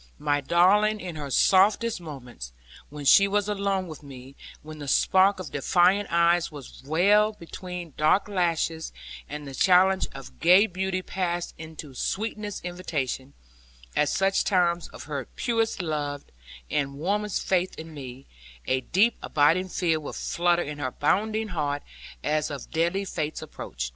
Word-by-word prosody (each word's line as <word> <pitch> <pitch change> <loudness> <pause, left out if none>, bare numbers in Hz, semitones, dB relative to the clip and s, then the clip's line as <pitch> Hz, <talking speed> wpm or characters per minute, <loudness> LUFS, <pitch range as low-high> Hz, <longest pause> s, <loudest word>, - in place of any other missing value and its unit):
My 145 - 0
darling 205 +8 +3
in 180 -4 -6
her 145 -2 -5
softest 200 - +3
moments, 125 - -9 0.4
when 145 0 -8
she 195 +8 +7
was 205 0 0
alone 200 -2 -1
with 155 -2 -9
me, 135 -1 -12 0.3
when 155 0 -10
the 145 - -7
spark 190 +8 +4
of 185 - -7
defiant 180 +7 +3
eyes 170 0 +3
was 145 -4 -11
veiled 205 +8 +3
beneath 175 -2 -8
dark 155 +7 +3
lashes, 165 -4 -1 0.4
and 150 0 -6
the 135 - -8
challenge 190 +5 +4
of 135 -1 -11
gay 180 +5 +6
beauty 185 -1 -2
passed 175 -2 -3
into 160 -3 -9
sweetest 210 - -3
invitation; 145 -7 -4 0.6
at 150 - +2
such 195 0 +2
times 175 -3 +1
of - - -11
her 140 -4 -4
purest 225 -5 0
love 145 -3 -3 0.5
and 140 -1 -1
warmest 205 +5 -1
faith 185 0 0
in 160 0 -9
me, 135 -2 -9 0.4
a 130 0 +1
deep 200 - +2
abiding 165 +6 +2
fear 165 -3 0
would 150 - -7
flutter 175 0 +1
in 145 0 -7
her 130 -3 -1
bounding 215 - 0
heart, 145 -5 -2 0.4
as 155 0 0
of 140 -4 -7
deadly 170 +5 0
fate's 155 -4 -4
approach. - - -6
170 Hz, 150 wpm, -26 LUFS, 145-190 Hz, 0.6 s, she